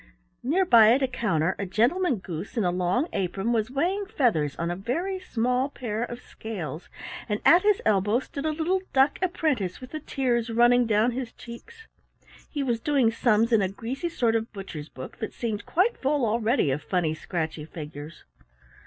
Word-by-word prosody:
Near 340 +10 +2
by 230 -7 +7
at 270 +2 +2
a - - +3
counter 190 -8 0
a 200 - -1
Gentleman 260 - +2
Goose 185 +2 -7
in 225 - +2
a 180 - +2
long 180 - 0
apron 195 +3 -1
was 220 -1 0
weighing 360 +9 -1
feathers 220 - +1
on 170 +1 -2
a - - -2
very 335 - -2
small 250 -4 0
pair 225 -5 -4
of 240 0 -4
scales, 175 -8 -7 0.4
and 210 0 0
at 345 +2 +7
his 415 0 +2
elbow 205 +1 +3
stood 280 +3 -5
a - - +1
little 335 +5 0
duck 270 +2 +3
apprentice 300 - -1
with 255 - -11
the 310 - -4
tears 245 -5 -1
running 240 +1 +4
down 220 +2 +3
his 245 -1 -4
cheeks. 445 - -12 0.6
He 290 -2 -2
was 240 -4 0
doing 265 -3 +2
sums 230 0 +2
in 220 - +5
a 190 - +1
greasy 255 - -4
sort 240 -8 +1
of 225 0 -1
butcher's 180 -7 -8
book 130 0 -9
that 220 - -4
seemed 220 -4 -3
quite 405 +8 +2
full 280 -1 +1
already 225 - +1
of 140 +3 -2
funny 175 -4 0
scratchy 160 -1 -4
figures. 150 -1 -9
235 Hz, 185 wpm, -26 LUFS, 195-275 Hz, 0.6 s, by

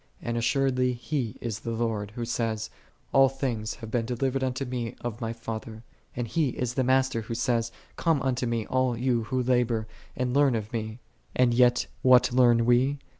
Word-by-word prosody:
"4 - - -5
And 120 - -1
assuredly 125 +1 +1
He 125 -1 -3
is 115 -2 -3
the 115 - -6
Lord, 115 -3 -2
Who 120 - -3
saith, 115 -2 -2 0.4
"All 135 -1 +6
things 125 -5 -3
have 115 -3 -9
been 115 -2 0
delivered 130 +2 -1
unto 130 +1 -1
Me 120 -3 -4
of 120 0 -5
My 115 -1 -2
Father;"5 115 0 -6 0.3
and 120 -1 -2
He 150 +4 +1
is 125 -1 -1
the 130 - +1
Master, 130 -1 +2
Who 115 +1 -5
saith, 115 -1 0 0.3
"Come 165 -4 +2
unto 130 -2 0
Me, 115 -2 -1
all 130 -2 0
ye 130 +3 -1
who 130 +3 -1
labor, 120 -3 +1 0.3
and 125 -1 -1
learn 140 -3 +4
of 110 0 -4
Me; 110 -1 -3 0.2
" - - -35
and 125 -2 +3
yet 125 0 +4 0.2
what 125 -1 +5
learn 120 -2 +5
we? 125 +4 +3
120 Hz, 195 wpm, -27 LUFS, 115-130 Hz, 0.4 s, All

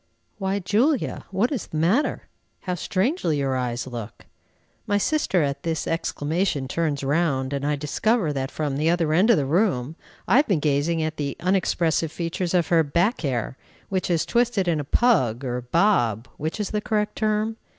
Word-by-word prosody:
"Why, 195 0 0
Julia! 225 - 0
what 200 +7 0
is 265 -8 -3
the 155 - -5
matter? 190 - +1 0.4
How 180 - -3
strangely 185 - 0
your 135 -2 0
eyes 125 -1 -2
look!" 115 -4 -8 0.6
My 205 - +2
sister 205 - +1
at 140 0 -2
this 165 -2 -2
exclamation 160 -2 -1
turns 145 -1 -1
round, 140 -2 0
and 140 0 -2
I 150 - +1
discover 155 - 0
that 135 -1 -2
from 145 0 -3
the 155 +3 +2
other 165 -3 +1
end 190 +8 +4
of 230 - +6
the 145 - 0
room 155 - +1 0.3
I - - +5
have 290 - +4
been 190 -7 +2
gazing 150 +3 +1
at 155 0 -3
the 140 -2 -3
unexpressive 170 -4 +1
features 170 +2 -2
of 175 -2 +2
her 170 -2 +5
"back 170 - +1
hair," 130 -3 -2 0.3
which 185 -1 -1
is 170 -2 +1
twisted 235 -6 +1
in 165 -3 +1
a - - -2
"pug," 135 - +2
or 125 0 -2
"bob," 125 - +1
which 160 +7 -4
is 210 - -2
the 210 - -1
correct 210 -1 -1
term? 215 +1 0
165 Hz, 180 wpm, -24 LUFS, 140-200 Hz, 0.6 s, of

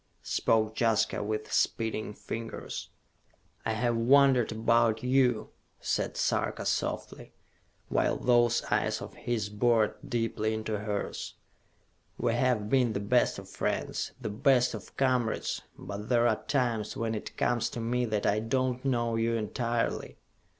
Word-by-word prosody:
spoke 110 -1 +1
Jaska 115 -3 +2
with 110 +1 -3
speeding 110 -2 0
fingers. 115 0 -6 0.8
"I 110 - +1
have 120 +1 +1
wondered 130 0 +5
about 115 0 +2
you," 125 -3 +2 0.3
said - - -1
Sarka - - 0
softly, - - -3 0.5
while - - +1
those 120 -1 +3
eyes - - +1
of - - -8
his 110 -4 -2
bored 110 +1 +2
deeply 115 -3 -1
into 110 -1 -3
hers. 105 -1 -4 0.8
"We 115 - +1
have 120 -3 +1
been 125 -1 +2
the 100 - -1
best 115 +5 +2
of - - -9
friends, - - -2
the 115 -5 -4
best 125 +2 +3
of - - -9
comrades; 125 -4 0 0.2
but 100 +3 -7
there 120 -1 +4
are 110 - 0
times 120 -6 0
when 115 -1 -1
it 105 - -6
comes 120 -1 +1
to - - -6
me 120 +2 0
that 110 -3 -1
I 105 - +3
do 130 +4 +1
not 125 +2 -8
know 120 -3 +1
you 115 +1 +1
entirely! 115 +1 -2
115 Hz, 145 wpm, -29 LUFS, 110-125 Hz, 0.8 s, wondered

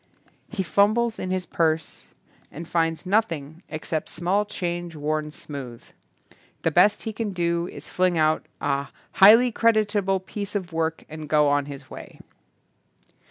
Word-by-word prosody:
He 200 -4 -2
fumbles 215 +5 +2
in 185 - -3
his 185 -1 -1
purse 160 -2 -1 0.4
and 165 +2 -8
finds 165 0 0
nothing 170 -6 -1
except 155 0 -4
small 190 +4 0
change 175 -3 -4
worn 150 +1 -2
smooth. 135 -6 -8 0.8
The 165 - +2
best 180 +6 +4
he 220 - -4
can 215 -2 -3
do 170 -1 0
is - - -10
to - - -14
fling 180 -2 +2
out 155 0 +2
a 140 0 -1 0.2
"highly 225 +6 +7
creditable 210 -4 +2
piece 200 +2 -6
of 185 -4 -3
work" 160 0 -2
and 155 -1 -8
go 150 -1 +4
on 145 0 +1
his 140 -2 -10
way. - - -10
170 Hz, 150 wpm, -24 LUFS, 155-200 Hz, 0.8 s, highly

